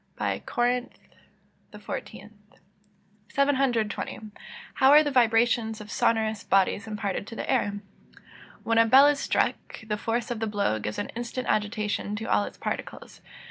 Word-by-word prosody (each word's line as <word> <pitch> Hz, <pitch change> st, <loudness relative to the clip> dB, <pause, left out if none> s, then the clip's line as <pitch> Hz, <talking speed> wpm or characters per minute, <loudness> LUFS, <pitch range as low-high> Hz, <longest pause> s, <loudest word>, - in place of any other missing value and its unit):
CORINTH. 245 Hz, +1 st, -1 dB, 0.8 s
XIV.] 210 Hz, -, -8 dB, 1.0 s
720. 265 Hz, -6 st, 0 dB, 0.5 s
How 265 Hz, -, +4 dB
are 300 Hz, +2 st, +8 dB
the 290 Hz, -, -2 dB
vibrations 230 Hz, -2 st, +2 dB
of 210 Hz, 0 st, -10 dB
sonorous 220 Hz, -4 st, 0 dB
bodies 195 Hz, +2 st, +1 dB
imparted 205 Hz, -2 st, -3 dB
to 230 Hz, -, -8 dB
the -, -, -5 dB
air? 205 Hz, -6 st, 0 dB, 0.8 s
When 230 Hz, 0 st, +2 dB
a 230 Hz, -, +5 dB
bell 265 Hz, +5 st, +8 dB
is 290 Hz, -1 st, +3 dB
struck, -, -, -1 dB
the 210 Hz, -1 st, -2 dB
force 230 Hz, +3 st, -2 dB
of 235 Hz, -, -3 dB
the 225 Hz, -, -2 dB
blow 200 Hz, -, 0 dB
gives 105 Hz, 0 st, -5 dB
an 205 Hz, -, -3 dB
instant 240 Hz, +2 st, -5 dB
agitation 210 Hz, -1 st, -1 dB
to 220 Hz, +1 st, -5 dB
all 205 Hz, -, +2 dB
its -, -, -10 dB
particles. -, -, -6 dB
225 Hz, 140 wpm, -26 LUFS, 210-245 Hz, 1.0 s, are